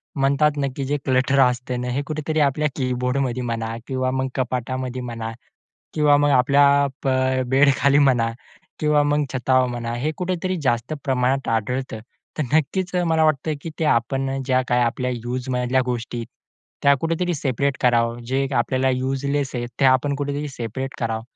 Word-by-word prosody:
म्हणतात 140 +2 +2
ना, 140 -1 0
की 140 - -3
जे 145 +2 0
क्लटर 130 +1 +2
असते 125 0 +2
ना, 125 0 -3
हे 135 +3 -1
कुठेतरी 155 +1 -2
आपल्या 150 +2 -1
कीबोर्डमध्ये 125 0 -1
म्हणा 115 -1 -3
किंवा 130 -1 -1
मग 130 0 -1
कपाटामध्ये 130 0 -3
म्हणा 115 -2 -5 0.6
किंवा 150 -2 +4
मग 145 0 +3
आपल्या 140 +2 +4 0.2
प 135 - -1 0.4
बेडखाली 140 +1 +4
म्हणा 125 -5 +3 0.5
किंवा 150 -1 +3
मग 145 0 +1
छतावर 130 0 +2
म्हणा, 120 -1 -4
हे 140 +6 -1
कुठेतरी 185 0 -2
जास्त 120 +2 0
प्रमाणात 130 0 0
आढळतं. 115 +1 -2 0.4
तर - - +2
नक्कीच 180 +5 0
मला 160 -1 +3
वाटतं, 155 0 +1
की 160 -1 -4
आपण 135 +1 0
ज्या 130 -1 +3
काही 125 0 0
युज 125 +1 -4
मधल्या 125 +1 +1
गोष्टी 120 -1 -3 0.6
त्या 140 0 +6
कुठेतरी 165 +2 -1
सेपरेट 140 0 -1
करावं. 120 -1 +2
जे 135 +2 0
आपल्याला 130 +2 +1
युजलेस 135 +2 -1
आहे 120 0 -2
ते - - +3
आपण 130 +2 +3
कुठेतरी 145 +1 -3
सेपरेट 130 +1 -5
करावं. 110 -1 -2
130 Hz, 155 wpm, -22 LUFS, 125-145 Hz, 0.6 s, त्या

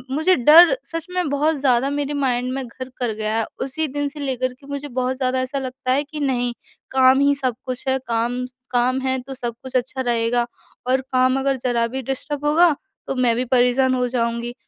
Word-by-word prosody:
मुझे 320 +5 +3
डर 325 - +7
सच 330 -1 -5
में 360 -3 -1
बहुत 300 +3 +1
ज़्यादा 265 -1 +2
मेरे 285 0 -2
माइंड 255 -3 0
में 265 0 -3
घर 255 +2 -8
कर 240 -3 -1
गया 215 +1 -2
है। 225 - 0 0.2
उसी 305 +4 -2
दिन 290 +1 -2
से 295 +1 -11
लेकर 255 -2 -2
के 275 +2 -18
मुझे 285 0 -5
बहुत 255 0 -2
ज़्यादा 255 -1 0
ऐसा 260 +2 -3
लगता 255 -1 -4
है 275 +3 +2
कि 300 +1 -8
नहीं 245 -4 0 0.4
काम 260 0 +5
ही 285 0 +4
सब 255 -4 -1
कुछ 255 -1 -5
है। 265 - +2
काम 240 +2 -1
स 250 0 -14 0.2
काम 255 +1 +2
है 260 0 0
तो 270 +2 -8
सब 240 -2 -4
कुछ 260 -1 -9
अच्छा 255 +1 -1
रहेगा 240 -1 +1 0.4
और 260 +1 +2
काम 255 0 +1
अगर 270 0 +1
ज़रा 240 -2 0
भी 265 +3 -4
डिस्टर्ब 280 +3 -4
होगा 320 +1 +4 0.3
तो 270 - -2
मैं 245 -2 +2
भी 250 +2 -1
परेशान 255 +1 +3
हो 250 -1 0
जाऊँगी। 235 -1 -2
260 Hz, 215 wpm, -21 LUFS, 245-280 Hz, 0.4 s, डर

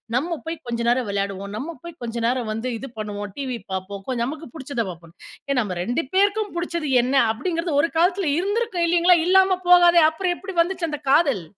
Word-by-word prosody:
நம்ம 330 +5 -1
போய் 325 +1 -3
கொஞ்ச 235 -1 -3
நேரம் 245 -1 +2
விளையாடுவோம், 200 0 -3
நம்ம 305 +9 -5
போய் 340 -1 -9
கொஞ்ச 235 0 -4
நேரம் 245 -3 -1
வந்து 225 +4 -3
இது 270 - -7
பண்ணுவோம், 205 -1 -5
டிவி 260 -3 -3
பார்ப்போம் 190 +1 -5
கொஞ்சம் 240 -2 -1
நமக்கு 315 +3 -7
புடிச்சத 265 -7 -3
பாப்போம், 170 -1 -12 0.3
ஏன் 270 -2 +2
"நம்ம 185 -5 -4
2 245 - -1
பேருக்கும் 405 +1 +2
புடிச்சது 340 -4 -3
என்ன?" 260 +2 -1 0.2
அப்படிங்கிறது 330 +5 -2
ஒரு 330 - 0
காலத்தில 355 -1 +2
இருந்திருக்கும் 405 -2 0
இல்லிங்களா? 345 +1 +5
இல்லாம 380 0 +4
போகாதே, 350 -1 +7
அப்புறம் 355 +2 -1
எப்படி 385 -2 -8
வந்துச்சு 345 -2 -2
அந்த 295 -1 -5
காதல்? 280 - +3
295 Hz, 185 wpm, -23 LUFS, 230-350 Hz, 0.3 s, போகாதே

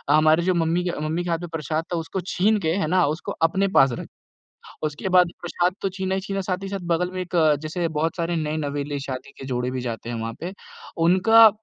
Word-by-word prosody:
हमारी 155 +2 +4
जो 185 +1 +2
मम्मी 170 +1 +1
के 175 -4 -2
मम्मी 170 +3 -1
के 175 - -4
हाथ 165 -1 0
में 175 -1 -6
प्रसाद 155 +1 -2
था, - - +1
उसको 165 +3 -3
छीन 210 +4 +2
के 160 -4 0
है 175 -6 0
ना 180 0 +3
उसको 155 +3 -3
अपने 190 +4 +3
पास 135 -1 +6
रख - - -7 0.8
उसके 155 +4 -2
बाद 180 -1 +5
प्रसाद 175 +1 0
तो 195 - +1
छीना 190 0 -2
ही 190 - 0
छीना। 195 +1 -3
साथ 185 0 -2
ही 195 - -4
साथ 195 0 -3
बगल 175 +1 +1
में 185 - -4
एक 180 - -10
अ, 155 -3 +5
जैसे 155 +4 -3
बहुत 160 +1 -1
सारे 170 0 -1
नये-नवेले 145 -2 -2
शादी 130 -2 -6
के - - -8
जोड़े 125 -1 -1
भी 130 - -3
जाते 115 -2 -5
हैं 120 - -3
वहाँ 115 0 -3
पे, 175 +3 -4 0.4
उनका 190 +7 +7
170 Hz, 235 wpm, -24 LUFS, 155-185 Hz, 0.8 s, उनका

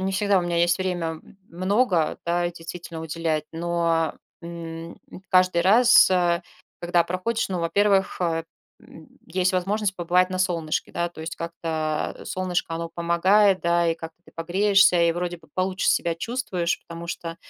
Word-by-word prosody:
не 190 +1 -1
всегда 200 0 +2
у - - -1
меня 175 -1 -2
есть 175 +2 +3
время 175 -4 -2 0.3
много, 185 -1 +1
да, 175 0 0
действительно 170 -1 -8
уделять. 160 -1 -2
Но, 165 -1 0 0.3
м, 165 -1 -8 0.3
каждый 185 -2 +4
раз, 235 +6 +6
э, 175 -1 +2 0.4
когда 175 0 +2
проходишь, 195 +6 -2
ну, 185 -2 -2
во-первых, 195 +2 +1 0.6
м, 160 - -15 0.2
есть 185 +2 0
возможность 195 +2 -1
побывать 180 +1 +2
на 185 - -3
солнышке, 170 -4 -1
да. 175 0 -1
То 170 - -12
есть 160 +1 -5
как-то 160 -2 -3
солнышко, 180 -3 -2
оно 165 0 -4
помогает, 185 +4 +3
да. 170 0 +2
И 165 - +1
как-то 165 0 -10
ты - - -19
погреешься, 190 +2 +3
и 170 0 +3
вроде 175 0 -3
бы - - -22
получше 185 0 -1
себя 170 -1 +2
чувствуешь. 185 -4 -2
Потому 170 0 -8
что, 165 -1 -5
175 Hz, 155 wpm, -24 LUFS, 165-185 Hz, 0.6 s, раз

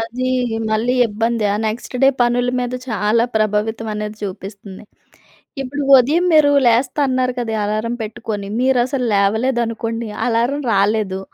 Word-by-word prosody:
అదీ 245 +3 -3 0.4
మళ్ళీ 225 +3 +1
ఇబ్బందే. 225 +1 -1
ఆ - - 0
నెక్స్ట్ 225 +3 -5
డే 270 - +7
పనులు 245 +1 +2
మీద 245 0 -3
చాలా 220 +1 +1
ప్రభావితం 215 +1 -1
అనేది 210 0 -5
చూపిస్తంది. 195 +1 -8 0.8
ఇప్పుడు 285 +2 -4 0.2
ఉదయం 300 +8 +2
మీరు 300 -2 +5
లేస్తా 245 +5 +2
అన్నారు 255 -1 0
కదా! 225 -2 -3
అలారం 215 +3 -2
పెట్టుకొని, 210 -2 -5
మీరసలు 255 0 +1
లేవలేదనుకోండి. 230 +2 0 0.2
అలారం 240 +5 0
రాలేదు, 200 -1 +1
230 Hz, 125 wpm, -18 LUFS, 215-250 Hz, 0.8 s, డే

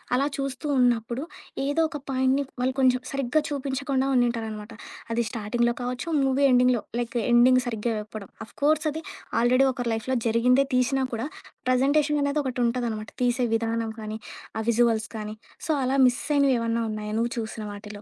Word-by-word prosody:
అలా 275 +3 +2
చూస్తూ 275 +2 -3
ఉన్నప్పుడు, 240 +1 +1 0.4
ఏదో 290 +4 +1
ఒక 295 - -5
పాయింట్‌ని 260 +2 +2 0.2
వాళ్ళు 260 +1 +1
కొంచెం 255 -1 +4
సరిగ్గా 275 +2 +1
చూపించకుండా 275 -1 -1
ఉండింటారనమాట. 225 -3 -1 0.4
అది 235 +1 +1
స్టార్టింగ్‌లో 235 +1 0
కావచ్చు, 250 +6 -3 0.2
మూవీ 270 +1 +3
ఎండింగ్‌లో, 250 -2 +4 0.2
లైక్ 240 0 -2
ఎండింగ్ 250 +2 +6
సరిగ్గా 225 0 -1
వెప్పడం 210 -2 -9 0.2
ఆఫ్‌కోర్స్ 305 +5 +1
అది 320 +2 -6 0.4
ఆల్రెడీ 255 +3 +4
ఒకరి 245 -1 -3
లైఫ్‌లో 240 +4 -1
జరిగిందే 250 +4 +4
తీశినా 260 +2 +2
కూడా 230 +3 -3 0.4
ప్రజెంటేషన్ 285 +4 +3
అనేది 285 +1 +1
ఒకటి 255 -2 -3
ఉంటుందనమాట. 235 -3 -2
తీసే 245 +1 +2
విధానం 225 0 -1
కానీ, 215 0 -5 0.4
ఆ - - -1
విజువల్స్‌ 230 -1 +2
కానీ 215 0 -5 0.3
సో 320 - +1
అలా 265 +2 +1
మిస్ 245 - 0
అయినవి 275 -2 +4
ఏమన్నా 230 0 0
ఉన్నాయా? 210 0 -4
నువ్వు 235 +1 0
చూసిన 220 -1 -5
వాటిలో? 205 0 -9
245 Hz, 155 wpm, -26 LUFS, 230-270 Hz, 0.4 s, ఎండింగ్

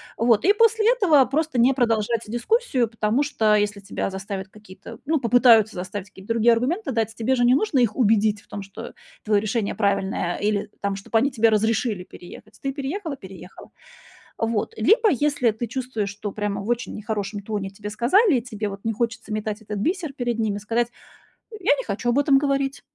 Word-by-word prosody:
Вот, 230 +1 +2
и 400 - +6
после 450 0 +3
этого 340 - +4
просто 285 0 -1
не 250 +3 +5
продолжать 230 -3 +1
дискуссию, 255 - 0
потому 225 +4 0
что 220 -7 +2
если 205 -1 0
тебя 195 - -3
заставят 195 0 -6
какие-то, 190 -1 -13
ну, 315 +1 +1
попытаются 235 -3 +5
заставить 185 +2 -6
какие-то 195 +1 -15
другие 230 +1 +4
аргументы 270 - -1
дать, 225 -1 -1
тебе 235 +4 0
же 245 - +1
не 245 +1 +5
нужно 305 -4 +1
их 230 -4 +1
убедить 215 -3 +3
в - - -28
том, 205 - -6
что 200 +4 -9 0.3
твоё 210 -1 +2
решение 215 0 -2
правильное, 195 -4 0
или 205 0 -1
там 200 -1 -2
чтоб 195 +3 -12
они 265 +5 +3
тебе 230 -4 +3
разрешили 215 -2 0
переехать. 210 +5 -13
Ты 275 - -2
переехала 290 +3 -4
переехала. 190 -3 -12 0.7
Вот, 225 - -1
либо 440 0 +4
если 285 -5 +1
ты 220 +3 -4
чувствуешь, 240 -3 -3
что 205 0 -6
прямо 205 -1 -3
в 200 - -8
очень 240 0 -2
нехорошем 210 -1 -4
тоне 205 -1 -4
тебе 205 +2 -8
сказали, 280 - +3
и - - -4
тебе, 215 -4 -5
вот, 200 0 -8
не 225 - 0
хочется 230 -1 -3
метать 215 0 -3
этот 210 -1 -6
бисер 330 - -1
перед 240 -3 -2
ними, 215 -3 -1
сказать: 230 +3 -1 0.6
"Я 395 -9 +1
не 265 - -5
хочу 220 +3 -2
об 245 +4 +2
этом 285 -1 +4
говорить". 275 -1 -1
225 Hz, 190 wpm, -23 LUFS, 210-265 Hz, 0.7 s, и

